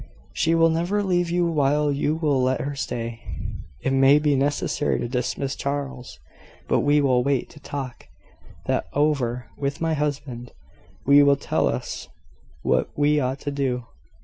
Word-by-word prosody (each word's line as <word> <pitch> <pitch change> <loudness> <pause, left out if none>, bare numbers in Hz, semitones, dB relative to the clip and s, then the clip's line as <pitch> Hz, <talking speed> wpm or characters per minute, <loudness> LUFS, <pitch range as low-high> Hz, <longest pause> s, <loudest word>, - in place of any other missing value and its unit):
"She 165 +1 +2
will 165 0 +5
never 175 +6 0
leave 175 -3 +1
you 175 0 +1
while 150 -2 +2
you 145 +2 0
will 150 -5 +1
let 130 0 +1
her 145 +1 -3
stay." 115 -3 -4 0.6
"It 135 - 0
may 135 +2 +6
be 150 -1 +2
necessary 145 +1 0
to - - -2
dismiss 125 +2 -2
Charles. 140 -2 -4 0.5
But - - +2
we 145 +1 +3
will 130 -3 +3
wait 140 -1 0
to 150 - -14
talk 135 -3 -6 0.6
that - - 0
over 135 -5 0
with 140 0 -2
my 165 -1 0
husband. 140 -5 -3 0.5
He 140 +1 +7
will 140 0 +5
tell 140 - 0
us - - -4 0.6
what 65 -1 +1
we 150 +1 +3
ought 130 0 -2
to 145 - -3
do. 130 -4 -1
140 Hz, 160 wpm, -24 LUFS, 130-150 Hz, 0.6 s, He